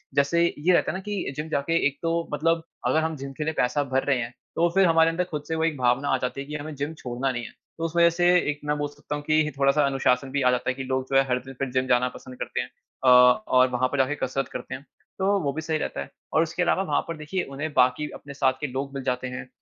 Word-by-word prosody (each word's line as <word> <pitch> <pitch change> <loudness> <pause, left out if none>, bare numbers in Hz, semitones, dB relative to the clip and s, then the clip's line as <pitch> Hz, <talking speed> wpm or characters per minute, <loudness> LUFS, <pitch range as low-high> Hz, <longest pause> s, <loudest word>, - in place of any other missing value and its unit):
जैसे 140 +5 +3
ये 170 +5 +3
रहता - - +3
है - - -4
ना - - -7
कि 200 -9 -3
जिम 150 +2 -5
जाके 150 +2 0
एक 140 0 -5
तो 165 - +1 0.2
मतलब 165 +2 +1 0.2
अगर 160 - +3
हम 160 0 -1
जिम 135 0 -6
के 155 - -2
लिए 160 +1 -1
पैसा 145 +4 +1
भर 130 +1 +2
रहे 140 -2 +2
हैं, 120 0 -4 0.2
तो 170 +1 +3
फ़िर 195 0 +6
हमारे 165 0 +5
अंदर 165 +2 0
ख़ुद 150 -2 -3
से 160 - -2
वो 160 - 0
एक 165 -3 0
भावना 125 +2 +1
आ - - +3
जाती 125 +2 -2
है 140 - -8
कि 150 - -6
हमें 155 +1 -5
जिम 145 +3 -3
छोड़ना 125 +2 -1
नहीं 120 -1 -4
है। - - -9 0.3
तो 165 - -5
उस 165 0 -4
वज़ह 170 0 +6
से 175 0 +4 0.2
एक 145 - -8
मैं 150 0 0
बोल 145 0 -1
सकता 145 0 -6
हूँ 145 - -6
कि 155 0 +2
थोड़ा-सा 140 +1 +4
अनुशासन 135 -1 +1
भी 140 +1 0
आ 125 -1 +4
जाता 125 0 -1
है - - +1
कि 135 +1 -6
लोग 130 0 0
जो - - +1
है 135 - +6
हर 125 0 +2
दिन 135 - -9
फ़िर 135 - -1
जिम 130 0 0
जाना 125 0 +3
पसंद 130 0 -11
करते - - -2
हैं, 125 - -7 0.3
अ, - - +2
और 125 +2 +6
वहाँ 125 +1 +1
पर 140 - -1
जाके 135 +2 +2
कसरत 135 +1 -2
करते - - -5
हैं। 140 - -11 0.3
तो 200 +1 +2
वो 140 - 0
भी 160 - -4
सही 160 0 -1
रहता 110 - -3
है, 70 - -7 0.2
और 160 - +4
उसके 170 +2 -2
अलावा 185 +2 +2
वहाँ - - +3
पर 165 - -5
देखिये 155 +5 -3
उन्हें 155 +3 -3
बाकी 130 +4 +2
अपने 140 - -10
साथ 135 -2 +2
के 145 - -1
लोग 135 +1 -4
मिल 135 -1 -5
जाते 130 0 -1
हैं, 130 0 -7
140 Hz, 290 wpm, -25 LUFS, 130-160 Hz, 0.3 s, फ़िर